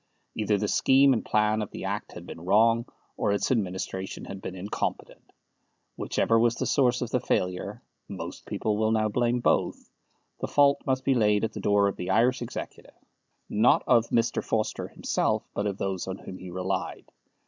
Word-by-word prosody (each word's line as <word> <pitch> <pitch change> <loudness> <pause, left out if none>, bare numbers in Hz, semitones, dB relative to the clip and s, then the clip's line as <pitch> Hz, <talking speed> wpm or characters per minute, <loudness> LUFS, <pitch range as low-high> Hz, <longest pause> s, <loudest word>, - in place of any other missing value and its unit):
Either 105 -1 +1
the 105 +1 -1
scheme 135 +5 +5
and 115 - -1
plan 105 0 +1
of 105 - -4
the - - -8
Act - - -4
had - - -9
been 80 - -9
wrong, 115 +6 +3 0.3
or - - +1
its 100 - 0
administration 95 -4 -2
had 95 0 -8
been 95 - -6
incompetent. 95 +3 -5 0.6
Whichever 115 0 +1
was 120 0 +3
the - - -2
source 125 -3 +2
of 120 - -6
the 125 - +2
failure 90 -6 -2 0.2
(most - - -8
people 105 -1 -1
will 110 0 +2
now 110 -1 +2
blame 120 +2 +1
both), - - 0 0.5
the - - -2
fault 140 -1 +4
must 130 -1 0
be 135 - +4
laid 105 -4 +2
at 110 - -1
the - - -6
door 100 0 +3
of 100 - -3
the 90 - -5
Irish 125 +2 +3
Executive; 120 - -7 0.5
not 110 +4 +3
of 115 -1 +4
Mr. 115 0 +1
Forster 110 -1 -1
himself, - - -1
but 105 - -1
of 100 -2 -3
those 95 -2 -3
on 95 0 -4
whom 95 - -9
he 90 - -9
relied. 95 +2 -3
110 Hz, 185 wpm, -27 LUFS, 100-120 Hz, 0.6 s, scheme